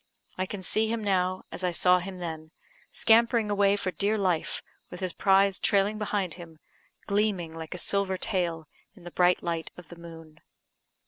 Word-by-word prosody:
I 185 0 -2
can 195 -1 -7
see 215 +4 +1
him 225 0 -2
now, 185 -2 0
as 185 - -5
I 180 - +2
saw 180 +1 +4
him 185 +1 -7
then, 160 -3 -6 0.4
scampering 230 -1 +3
away 200 0 +3
for 195 -2 -2
dear 205 +3 0
life, 185 -5 -1 0.3
with 180 - -9
his 185 -2 -3
prize 195 0 +3
trailing 205 +2 +1
behind 200 -5 -1
him, 165 -2 -12 0.5
gleaming 200 -5 0
like 165 +1 -7
a - - -6
silver 190 +1 0
tail 170 -5 -2 0.3
in 185 - -17
the 175 - -9
bright 180 +1 +2
light 165 -1 -3
of 180 -3 -13
the 170 - -12
moon. 165 -2 -12
185 Hz, 180 wpm, -27 LUFS, 170-200 Hz, 0.5 s, saw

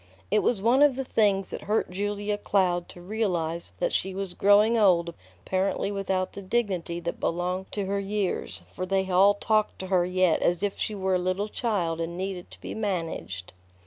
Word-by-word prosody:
It 215 - +4
was 205 -5 +1
one 245 +5 +4
of 290 -3 +6
the 270 0 -3
things 200 -5 +2
that - - -5
hurt 210 -2 0
Julia 205 +2 -2
Cloud 185 -4 +1
to - - -11
realize 175 - -2
that - - 0
she 190 0 -1
was 195 -2 -3
growing 205 +4 +5
old 175 -6 +3 0.3
apparently 190 +1 0
without 190 -2 -1
the 200 - -7
dignity 190 -5 -1
that 170 0 -4
belonged 180 +2 -2
to 205 -2 -1
her 200 +1 -1
years, 200 -1 -2
for 185 - -4
they 190 0 +1
all 195 +3 +6
talked 215 +1 +1
to 190 - -6
her 180 -1 +4
yet 180 -1 +2
as 175 +2 +1
if 200 -1 -1
she 215 - -1
were 190 -1 0
a 180 - +3
little 185 +3 -1
child 175 -9 -1
and 170 +1 -4
needed 185 -1 -4
to - - -14
be - - -6
managed. 165 - -4
190 Hz, 195 wpm, -27 LUFS, 180-205 Hz, 0.3 s, of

